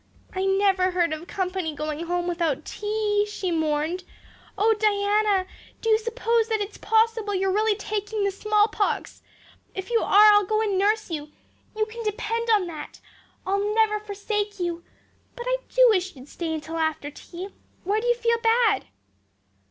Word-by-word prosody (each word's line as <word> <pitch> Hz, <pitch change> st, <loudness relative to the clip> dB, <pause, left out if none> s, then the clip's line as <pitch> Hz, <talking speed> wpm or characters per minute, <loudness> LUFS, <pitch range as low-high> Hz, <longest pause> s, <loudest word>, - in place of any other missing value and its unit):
"I 380 Hz, 0 st, -1 dB
never 385 Hz, -1 st, +3 dB
heard 350 Hz, -3 st, +1 dB
of 315 Hz, +3 st, -7 dB
company 365 Hz, -4 st, -2 dB
going 305 Hz, +2 st, -4 dB
home 350 Hz, 0 st, -1 dB
without 335 Hz, -5 st, -1 dB
tea," 420 Hz, -1 st, 0 dB
she 380 Hz, -3 st, -3 dB
mourned. 315 Hz, +2 st, -1 dB, 0.5 s
"Oh, 440 Hz, +3 st, +4 dB
Diana, 410 Hz, -2 st, +2 dB, 0.3 s
do 455 Hz, -, 0 dB
you 435 Hz, -, +5 dB
suppose 460 Hz, 0 st, 0 dB
that 445 Hz, -1 st, 0 dB
it's 410 Hz, 0 st, -5 dB
possible 445 Hz, -2 st, +1 dB
you're 380 Hz, 0 st, +1 dB
really 430 Hz, +1 st, +2 dB
taking 415 Hz, 0 st, -3 dB
the 400 Hz, -, +1 dB
smallpox? 420 Hz, +1 st, 0 dB, 0.5 s
If 380 Hz, +4 st, -6 dB
you 460 Hz, -, +4 dB
are 420 Hz, +1 st, +7 dB
I'll 415 Hz, 0 st, +5 dB
go 430 Hz, +3 st, 0 dB
and 425 Hz, -3 st, 0 dB
nurse 420 Hz, +1 st, +1 dB
you, 300 Hz, -1 st, -5 dB, 0.5 s
you 435 Hz, -, +2 dB
can 455 Hz, +2 st, -8 dB
depend 460 Hz, +2 st, -2 dB
on 420 Hz, -4 st, +4 dB
that. 325 Hz, -3 st, -8 dB, 0.5 s
I'll 400 Hz, +2 st, 0 dB
never 435 Hz, -1 st, +3 dB
forsake 415 Hz, 0 st, -3 dB
you. 345 Hz, -1 st, -3 dB, 0.5 s
But 480 Hz, -, -7 dB
I -, -, +2 dB
do -, -, +5 dB
wish 375 Hz, -3 st, 0 dB
you'd 260 Hz, +1 st, -13 dB
stay 320 Hz, 0 st, -4 dB
till 320 Hz, +2 st, -6 dB
after 315 Hz, -2 st, -1 dB
tea. 355 Hz, +6 st, -9 dB, 0.3 s
Where 415 Hz, +4 st, 0 dB
do 485 Hz, -, -3 dB
you 485 Hz, -, +4 dB
feel 465 Hz, -1 st, +1 dB
bad?" 455 Hz, -3 st, +3 dB
410 Hz, 165 wpm, -25 LUFS, 360-435 Hz, 0.5 s, are